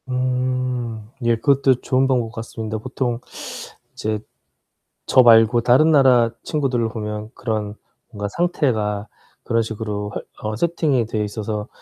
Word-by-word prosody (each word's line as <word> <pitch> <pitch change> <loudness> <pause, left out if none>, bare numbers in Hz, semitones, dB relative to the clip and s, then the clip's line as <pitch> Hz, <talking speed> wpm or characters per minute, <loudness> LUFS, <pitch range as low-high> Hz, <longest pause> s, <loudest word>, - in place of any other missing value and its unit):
음 125 -3 -1 0.2
예. 120 0 +3
그것도 135 +1 +2
좋은 130 +1 +2
방법 120 -4 0
같습니다. 110 -1 -5
보통 120 +2 -3 0.7
이제 110 0 -2 0.9
저 130 - +6
말고 115 0 +6
다른 130 +7 +5
나라 130 -6 +5
친구들을 130 -6 0
보면 105 -1 -5
그런 110 -3 -3 0.4
뭔가 105 -3 -4
상태가 110 - 0 0.4
그런 115 0 +1
식으로 105 -2 -4 0.2
화 105 - -6
어 110 - -3
세팅이 150 -5 +1
돼 110 -1 -1
있어서 105 +1 -4
115 Hz, 260 characters per minute, -21 LUFS, 110-130 Hz, 0.9 s, 저